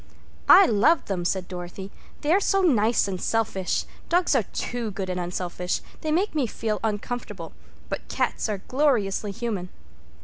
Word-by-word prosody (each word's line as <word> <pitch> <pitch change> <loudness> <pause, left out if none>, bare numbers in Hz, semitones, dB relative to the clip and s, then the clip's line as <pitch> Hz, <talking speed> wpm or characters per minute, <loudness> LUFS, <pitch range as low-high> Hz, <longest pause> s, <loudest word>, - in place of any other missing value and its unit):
"I - - +10
love 235 +10 +3
them," 185 -3 -2
said 185 0 -1
Dorothy. 180 +2 -7 0.3
"They 295 - +1
are 385 - +5
so 390 -1 +2
nice 230 - +3
and 185 -2 -4
selfish. 215 -5 0 0.2
Dogs 350 -1 +3
are 260 - +4
too 235 +3 -4
good 190 -1 -4
and 180 - -2
unselfish. 180 0 -2 0.2
They 310 - -1
make 370 +7 +1
me 290 -6 +1
feel 215 0 -2
uncomfortable. 210 -5 -4 0.3
But - - -5
cats - - -1
are 200 -3 -3
gloriously 235 -8 +1
human." 200 -4 -3
210 Hz, 160 wpm, -25 LUFS, 185-250 Hz, 0.3 s, I